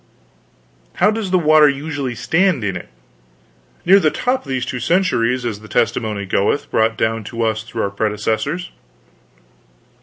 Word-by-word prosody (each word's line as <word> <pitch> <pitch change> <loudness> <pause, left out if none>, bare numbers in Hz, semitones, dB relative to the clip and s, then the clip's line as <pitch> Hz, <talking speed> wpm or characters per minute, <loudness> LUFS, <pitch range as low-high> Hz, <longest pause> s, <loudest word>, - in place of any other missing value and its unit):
"How 210 - +3
does 215 -3 -3
the 185 - +3
water 155 -3 +5
usually 140 -3 -3
stand 175 - +1
in 95 -2 -2
it?" 85 - -8 1.0
"Near 190 +3 +7
to - - +2
the 155 - +3
top, 250 - -1
these 130 -2 -2
two 130 -2 -4
centuries, 125 - +1
as 110 -4 -3
the 110 - -13
testimony 110 -3 -1
goeth, 100 +8 0
brought 110 0 +1
down 110 0 -1
to 115 +2 -3
us 110 -1 0
through 110 0 -4
our 100 - -2
predecessors." 110 - -2
125 Hz, 155 wpm, -19 LUFS, 110-160 Hz, 1.0 s, Near